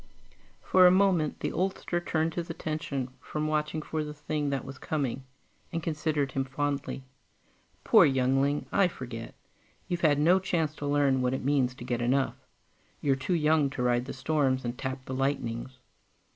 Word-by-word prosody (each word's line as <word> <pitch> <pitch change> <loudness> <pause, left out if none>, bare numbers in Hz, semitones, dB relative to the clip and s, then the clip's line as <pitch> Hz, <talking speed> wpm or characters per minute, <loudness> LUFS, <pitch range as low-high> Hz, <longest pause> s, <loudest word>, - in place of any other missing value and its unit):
For 185 -1 +6
a - - +8
moment, 185 -5 +2
the - - -1
oldster 185 -1 -1
turned 165 -1 -1
his 170 0 -4
attention 155 -5 -3
from 155 0 -4
watching 155 0 -1
for 155 0 -2
the 150 0 -7
thing 150 0 -2
that 140 -1 -2
was 135 - -9
coming, 135 -4 -2 0.5
and 165 - -3
considered 150 -3 -1
him 135 - 0
fondly. 140 0 -3 0.8
"Poor - - +7
youngling. 135 +2 +2
I 195 -2 +4
forget. 120 -8 -7 0.5
You've 175 -2 -2
had 150 -3 +4
no 170 +6 +5
chance 170 -5 0
to 145 - -4
learn 140 -2 +2
what 125 +1 +1
it 130 - -5
means 135 -3 +2
to 120 - -9
get 120 -1 -2
enough. 130 +3 +1 0.7
You're 140 -2 +2
too 135 +7 -1
young 155 -2 +3
to 135 -2 -3
ride 120 0 +2
the - - -6
storms 130 -2 0
and 120 +1 -2
tap 130 0 -5
the 130 - -5
lightnings.... 130 -2 -2
145 Hz, 170 wpm, -29 LUFS, 130-155 Hz, 0.8 s, a